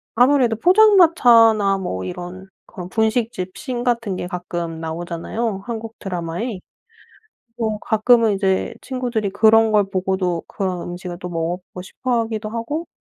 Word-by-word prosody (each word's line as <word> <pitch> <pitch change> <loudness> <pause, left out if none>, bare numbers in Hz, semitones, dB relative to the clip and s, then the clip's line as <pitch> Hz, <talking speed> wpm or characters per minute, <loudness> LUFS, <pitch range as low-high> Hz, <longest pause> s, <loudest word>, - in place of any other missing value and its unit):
아무래도 250 -1 +4
포장마차나 245 - +5
뭐 95 - -4
이런 180 - -7 0.2
그런 180 -5 -9
분식집 220 -4 -1
신 250 -4 -4
같은 235 -5 -1
게 180 - -4
가끔 175 -2 -5
나오잖아요, 175 +6 -4
한국 225 -1 -6
드라마에. 180 +4 -4 1.0
뭐 220 -2 -1
가끔은 225 0 +3
이제 195 -1 0
친구들이 245 -6 -3
그런 220 +2 +4
걸 210 -1 +5
보고도 185 -2 -1
그런 185 -3 -3
음식을 175 0 -7
또 180 - -6
먹어보고 175 +2 -4
싶어 235 +5 -2
하기도 220 -1 -4
하고 235 +9 -4
210 Hz, 310 characters per minute, -20 LUFS, 180-235 Hz, 1.0 s, 포장마차나